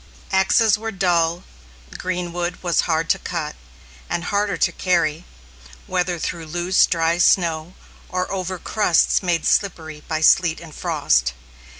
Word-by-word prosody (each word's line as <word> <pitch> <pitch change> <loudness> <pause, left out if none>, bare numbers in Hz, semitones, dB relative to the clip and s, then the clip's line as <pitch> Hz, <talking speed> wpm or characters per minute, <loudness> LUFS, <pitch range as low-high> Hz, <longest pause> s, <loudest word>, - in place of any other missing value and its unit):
Axes 205 +3 +3
were 225 0 -4
dull, 175 -3 +1 0.5
green 180 -1 -3
wood 175 +1 -4
was 175 -2 +2
hard 165 0 +1
to - - 0
cut, 160 -4 -4 0.5
and 170 - -2
harder 200 +1 -1
to - - +2
carry, 170 -2 0 0.6
whether 180 -1 -1
through 165 0 -5
loose, 175 +3 +2
dry 165 0 +1
snow, 170 -1 +2 0.3
or 185 0 -2
over 185 -1 -3
crusts 180 -2 +2
made 175 -3 -1
slippery 160 -6 0
by 155 -1 -1
sleet 165 +1 +4
and 165 -2 -12
frost. 75 - +1
175 Hz, 135 wpm, -21 LUFS, 165-185 Hz, 0.6 s, sleet